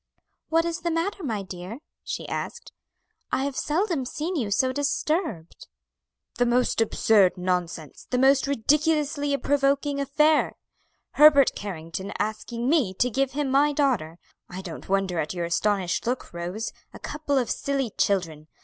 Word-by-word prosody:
"What 330 +1 +3
is 335 0 -2
the 340 - -1
matter, 340 +5 -1
my 220 -8 -2
dear?" 185 +4 -7 0.3
she - - -5
asked; - - -5 0.6
"I 265 - +1
have 280 -1 -3
seldom 330 -1 0
seen 310 +8 -4
you 240 -10 -1
so 260 +5 +2
disturbed." 285 - -2 0.7
"The 245 - +4
most 240 -1 +2
absurd 205 -3 +3
nonsense! 180 -4 -3
the 250 - 0
most 270 +1 +4
ridiculously 290 +2 +1
provoking 280 0 +1
affair! 300 +3 +2 0.6
Herbert 290 -2 +7
Carrington 190 -1 -6
asking 230 +3 -3
me 265 - +2
to 250 +5 +1
give 270 +3 0
him 285 -1 -1
my 290 +2 +4
daughter! 245 - 0 0.3
I 185 +1 -6
don't 170 -1 -8
wonder 195 -3 0
at 155 +3 -2
your 175 -1 -2
astonished 185 +2 0
look, 245 -5 -3
Rose; 180 +6 -4 0.2
a - - -11
couple 295 -2 -2
of 250 -3 0
silly 275 -4 -1
children. 165 -6 0
255 Hz, 150 wpm, -25 LUFS, 190-290 Hz, 0.7 s, Herbert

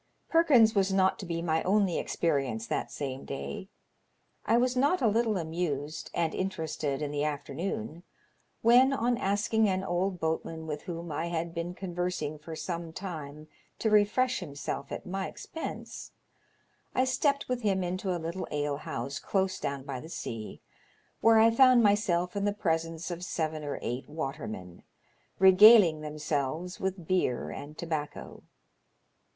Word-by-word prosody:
Perkins 270 -10 +5
was 195 -1 +2
not 190 0 +3
to 190 - -6
be 165 -1 -2
my 160 -1 +1
only 195 -3 +2
experience 135 -9 -1
that - - -2
same 135 -2 -4
day. 190 +8 -6 0.8
I 230 - +4
was 250 +1 +2
not 285 +8 +3
a 240 - +3
little 220 -1 +2
amused 160 -3 -3
and 165 -2 0
interested 155 -6 -2
in 145 - -3
the 145 0 -1
afternoon 150 - -3 0.6
when, 250 +4 +6
on 245 -2 +1
asking 205 +2 +2
an 190 0 0
old 180 +1 -1
boatman 160 0 -2
with 150 -1 -4
whom 170 -1 -6
I 160 +3 -2
had 170 0 -3
been 170 +1 -4
conve^rsing 175 -5 -3
for 160 +1 -7
some 170 -1 -4
time 155 -5 -7 0.3
to 220 - 0
refresh 215 +5 +3
himself 140 -4 -5
at - - -5
my 190 +1 -3
expense, 325 - -7 0.8
I 255 - +4
stepped 280 +2 +1
with 250 -1 -2
him 195 -4 +1
into 185 +2 -3
a 180 - 0
little 170 +3 -4
alehouse 145 -1 -3
close 190 -1 0
down 140 -1 -3
by 135 -2 -5
the 160 - -10
sea, 115 -9 -6 0.6
where 225 0 +6
I 225 +1 +6
found 255 0 +6
myself 185 -4 +2
in 200 0 0
the 205 - +1
presence 165 -3 -2
ot 175 0 -5
seven 155 -3 -2
or 145 - -3
eight 125 +3 -4
watermen, 135 - -6 0.6
regaling 190 -3 +8
themselves 150 +3 -3
with 190 -2 -3
beer 125 - 0
and 150 - -8
tobacco. 155 -3 -5
170 Hz, 150 wpm, -29 LUFS, 150-200 Hz, 0.8 s, regaling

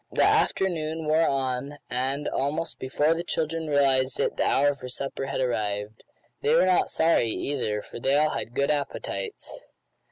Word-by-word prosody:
The - - +2
afternoon 160 -4 +1
wore 155 +2 +3
on, 135 +1 -1
and, 130 +4 -2
almost 155 +5 -2
before 145 +4 +1
the 165 +1 -3
children 165 -1 -2
realized 135 -3 +2
it - - 0
the - - +1
hour 145 +1 +3
for 125 -2 -9
supper 135 +1 -4
had - - -3
arrived. 105 -4 -2 0.4
They 450 +2 +3
were - - +5
not 185 -1 +3
sorry, 160 -8 +2
either, 110 -5 -2
for - - -9
they 135 +3 +2
all 155 +1 +3
had 120 - -4
good 140 +1 +2
appetites. 140 -9 -4
140 Hz, 165 wpm, -26 LUFS, 130-155 Hz, 0.4 s, were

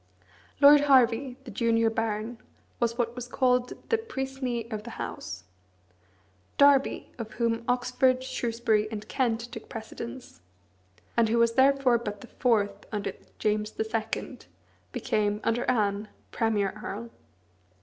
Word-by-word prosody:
Lord 290 +1 +9
Hervey, 255 -2 +3
the 250 - -9
junior 230 +1 +2
baron, 225 +1 -2 0.4
was 235 -1 0
what 240 -1 -1
was 245 -1 -6
called 250 -1 0
the 455 - +3
"Puisné 265 - -4
of 215 - -3
the 235 +2 -9
House." 95 +2 -6 1.1
Derby, 280 -1 +4
of 220 -2 -6
whom 230 -1 0
Oxford, 255 +1 +2
Shrewsbury, 230 -4 0
and 215 -1 -6
Kent 235 -3 0
took 225 - -9
precedence, 235 - -8 0.7
and 230 -2 +3
who 230 - +2
was 235 0 +4
therefore 265 -2 +4
but 210 -3 -6
the - - -10
fourth 205 -5 +1
under 210 -2 -2 0.2
James 210 0 -1
II., 220 +3 -2 0.5
became 205 - 0
(under 230 +2 +1
Anne) 210 -3 +1 0.2
premier 210 -4 +1
earl. 230 +4 -6
230 Hz, 130 wpm, -28 LUFS, 220-250 Hz, 1.1 s, Lord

